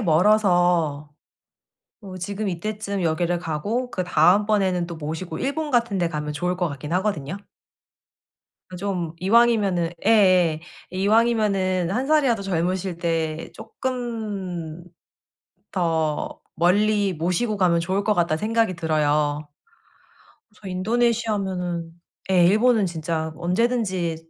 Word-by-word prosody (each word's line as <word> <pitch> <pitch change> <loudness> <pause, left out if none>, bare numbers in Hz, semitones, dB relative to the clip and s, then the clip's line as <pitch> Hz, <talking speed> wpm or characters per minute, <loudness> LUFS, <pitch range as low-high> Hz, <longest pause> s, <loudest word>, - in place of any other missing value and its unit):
멀어서 175 -5 +2 0.9
어 190 -2 -9
지금 200 +3 -3
이때쯤 200 +2 -4
여기를 170 +2 0
가고 205 +10 -2
그다음번에는 185 +1 +2
또 170 - -6
모시고 160 +2 -5
일본 295 +2 -2
같은 235 -4 +1
데 175 -2 0
가면 150 -1 -4
좋을 180 +4 -2
것 175 -2 0
같긴 145 +2 -7
하거든요. 185 -3 -1 1.4
좀 180 -5 -3
이왕이면은 200 -5 +3
예예. 185 -7 +4 0.3
'이왕이면은 195 -3 +1
1 250 +6 -1
살이라도 270 -9 +2
젊으실 185 0 -1
때 165 -2 -2
쪼끔 205 -10 -5 0.9
더 160 -4 -1 0.2
멀리 200 +3 +2
모시고 180 +7 -1
가면 175 -3 +2
좋을 190 +4 -1
것 210 - +2
같다.'는 170 -3 +1
생각이 225 -3 +1
들어요. 150 -2 0 1.0
그래서 210 -2 -11
인도네시아면은 190 -5 -1 0.4
예 180 -2 +5
일본은 220 +1 +3
진짜 160 -2 -3
언제든지 185 -2 0
185 Hz, 255 characters per minute, -23 LUFS, 165-210 Hz, 1.4 s, 예